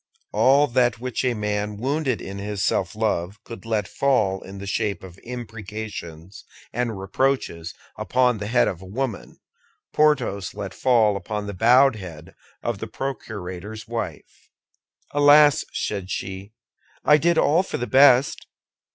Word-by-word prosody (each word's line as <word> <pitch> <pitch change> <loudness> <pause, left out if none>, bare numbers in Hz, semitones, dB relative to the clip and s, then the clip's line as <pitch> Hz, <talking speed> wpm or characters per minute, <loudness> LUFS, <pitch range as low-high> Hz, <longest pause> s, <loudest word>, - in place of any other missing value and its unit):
All 135 +7 +5
that 125 -3 +1
which 125 0 -3
a 125 -2 +1
man 105 -1 -2
wounded 135 +1 -1
in 100 0 -7
his 100 0 -2
self 95 - 0
love 105 -3 -1
could 115 -1 -10
let 105 -4 0
fall 110 -9 +1
in 100 +1 -10
the 100 - -7
shape 100 -1 -2
of 95 0 -12
imprecations 105 -7 -8 0.3
and 120 -3 -2
reproaches 95 -5 -1 0.2
upon 125 -3 +2
the 105 - -4
head 120 +3 +3
of 90 - -4
a - - -10
woman 115 +2 -4 0.6
Porthos 140 -11 +1
let 100 -2 -6
fall 115 -5 +3
upon 105 +2 -4
the 100 - -5
bowed 120 +5 +5
head 80 -4 -10 0.3
of 115 -4 -2
the 115 - -5
procurator's 110 -4 -6
wife. 115 0 -6 0.6
"Alas," 145 0 +6
said 100 -3 -3
she, 95 +2 -5 0.5
"I 150 - +7
did 170 +2 +2
all 160 +2 +4
for 190 - -5
the 120 - -2
best! 135 0 +4
110 Hz, 145 wpm, -23 LUFS, 100-130 Hz, 0.6 s, I